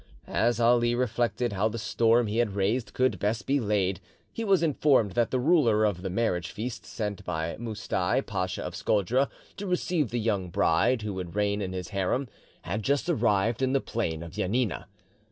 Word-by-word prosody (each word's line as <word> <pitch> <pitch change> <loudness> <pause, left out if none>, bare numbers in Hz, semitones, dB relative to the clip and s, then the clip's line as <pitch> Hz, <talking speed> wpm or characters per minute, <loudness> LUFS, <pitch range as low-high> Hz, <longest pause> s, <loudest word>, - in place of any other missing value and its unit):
As 120 0 +1
Ali 120 0 +4
reflected 120 -1 0
how 100 +3 +1
the 115 - -5
storm 115 +1 +2
he 105 +1 -2
had 105 -5 0
raised 105 +5 -1
could 130 -7 +1
best 105 +4 -1
be 140 +1 +2
laid, 100 -4 0 0.3
he 230 - -3
was 195 -5 +3
informed 140 -8 +3
that 115 +4 +1
the 130 - 0
ruler 125 -8 +4
of 100 -4 -1
the 95 - -3
marriage 90 -3 -1
feast 115 0 -6
sent 105 -3 -4
by 80 -1 -3
Moustai, 110 0 -1
Pacha 95 -4 -3
of 90 0 -5
Scodra, 105 +8 +1 0.3
to 205 - -5
receive 175 -6 0
the 120 - -2
young 100 -5 -1
bride 85 +8 +2
who 100 -3 -3
should 90 0 -6
reign 105 0 +1
in 95 -1 -3
his 90 -1 -5
harem, 100 +7 -1 0.4
had 100 +6 -3
just 140 +8 0
arrived 115 - +1
in 130 0 +1
the 135 - +3
plain 85 -11 -3
of 85 - -9
Janina. 105 +2 -1
110 Hz, 190 wpm, -27 LUFS, 95-125 Hz, 0.4 s, Ali